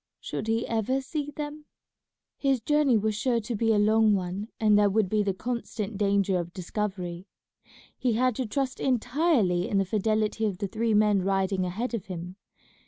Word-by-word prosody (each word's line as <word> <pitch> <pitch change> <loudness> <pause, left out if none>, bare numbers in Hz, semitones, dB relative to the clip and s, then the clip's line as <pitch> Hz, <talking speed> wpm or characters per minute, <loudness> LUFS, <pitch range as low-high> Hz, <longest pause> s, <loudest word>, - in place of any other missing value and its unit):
Should 215 - -5
he 225 +1 +1
ever 230 +4 0
see 290 +2 -4
them? 295 +1 -6 0.7
His 275 -2 +1
journey 290 0 +3
was 215 +1 0
sure 235 +3 +1
to 225 +2 -4
be 225 +1 +2
a 215 - +3
long 215 0 +4
one, 190 +2 -3
and 215 -2 +4
there 205 0 +5
would 205 -1 +1
be 215 +1 +2
the 200 -1 +1
constant 225 -2 -4
danger 200 -2 +2
of 175 0 -5
discovery. 185 -1 -4 0.7
He 245 -3 0
had 250 +1 +2
to 255 - -2
trust 260 +3 -2
entirely 245 - +1
in 200 - +1
the 195 - +2
fidelity 215 +2 0
of 195 -3 -3
the 200 - -2
three 225 +2 0
men 210 -2 +4
riding 195 0 0
ahead 225 +7 -3
of 220 -5 -4
him. 180 0 -7
215 Hz, 180 wpm, -27 LUFS, 195-240 Hz, 0.7 s, there